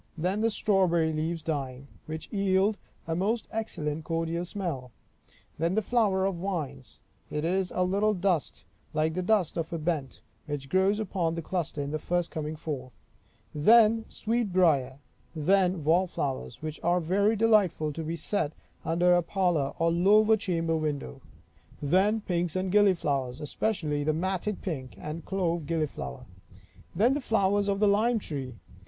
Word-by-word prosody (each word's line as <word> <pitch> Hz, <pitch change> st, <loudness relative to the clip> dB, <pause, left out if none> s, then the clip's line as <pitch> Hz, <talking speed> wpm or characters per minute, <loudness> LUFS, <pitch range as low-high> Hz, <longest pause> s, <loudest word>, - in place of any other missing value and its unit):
Then 185 Hz, +6 st, 0 dB
the 225 Hz, -, +3 dB
strawberry 180 Hz, -7 st, +2 dB
leaves 160 Hz, +1 st, -2 dB
dying, 135 Hz, -4 st, -4 dB, 0.2 s
which 160 Hz, 0 st, -5 dB
yield 200 Hz, +1 st, +2 dB, 0.3 s
a 165 Hz, -, -2 dB
most 210 Hz, +6 st, 0 dB
excellent 160 Hz, -9 st, -3 dB
cordial 165 Hz, +1 st, -2 dB
smell. 170 Hz, -9 st, -4 dB, 0.7 s
Then 170 Hz, +3 st, +1 dB
the 220 Hz, -, +1 dB
flower 200 Hz, -5 st, +2 dB
of 195 Hz, -2 st, -1 dB
vines; 150 Hz, -, -5 dB, 0.3 s
it 150 Hz, +1 st, -2 dB
is 185 Hz, +2 st, 0 dB
a 180 Hz, -, +2 dB
little 200 Hz, +3 st, +1 dB
dust, 175 Hz, -, -1 dB, 0.3 s
like 155 Hz, +1 st, +1 dB
the 185 Hz, -, -1 dB
dust 185 Hz, -3 st, +1 dB
of 165 Hz, -1 st, -3 dB
a 170 Hz, -, -2 dB
bent, 155 Hz, -5 st, -3 dB, 0.2 s
which 145 Hz, -2 st, -5 dB
grows 190 Hz, +5 st, +2 dB
upon 175 Hz, -6 st, -1 dB
the 165 Hz, -, -4 dB
cluster 165 Hz, -4 st, -2 dB
in 140 Hz, -, -4 dB
the 155 Hz, -, -2 dB
first 175 Hz, +1 st, -1 dB
coming 155 Hz, 0 st, -4 dB
forth. 130 Hz, -7 st, -6 dB, 0.6 s
Then 220 Hz, +7 st, +5 dB
sweet 230 Hz, -2 st, -1 dB
briar. 145 Hz, -8 st, +3 dB, 0.4 s
Then 180 Hz, +1 st, +2 dB
wall 170 Hz, +5 st, +3 dB
flowers, 135 Hz, -5 st, -4 dB
which 155 Hz, -1 st, -5 dB
are 175 Hz, +2 st, +2 dB
very 200 Hz, +6 st, +2 dB
delightful 205 Hz, -9 st, +3 dB
to 165 Hz, -, -5 dB
be 160 Hz, +2 st, -3 dB
set 160 Hz, -2 st, -1 dB, 0.3 s
under 175 Hz, +2 st, +3 dB
a 175 Hz, -, +4 dB
parlor 175 Hz, -6 st, 0 dB
or 165 Hz, 0 st, +2 dB
lower 210 Hz, +6 st, +5 dB
chamber 165 Hz, -5 st, -1 dB
window. 145 Hz, -3 st, -3 dB, 0.6 s
Then 190 Hz, +9 st, +2 dB
pinks 175 Hz, -3 st, -1 dB
and 185 Hz, 0 st, -1 dB
gilliflowers, 150 Hz, -11 st, +2 dB
especially 150 Hz, -2 st, -1 dB
the 155 Hz, +1 st, +1 dB
matted 185 Hz, +4 st, -2 dB
pink 135 Hz, -9 st, -5 dB
and 155 Hz, +2 st, -6 dB
clove 170 Hz, -5 st, -1 dB
gilliflower. 155 Hz, -, -3 dB, 0.7 s
Then 230 Hz, +9 st, +4 dB
the 290 Hz, -, -1 dB
flowers 205 Hz, -3 st, +1 dB
of 200 Hz, -1 st, 0 dB
the 210 Hz, -, +4 dB
lime 220 Hz, +4 st, +3 dB
tree. 135 Hz, -, -5 dB
175 Hz, 160 wpm, -28 LUFS, 155-195 Hz, 0.7 s, Then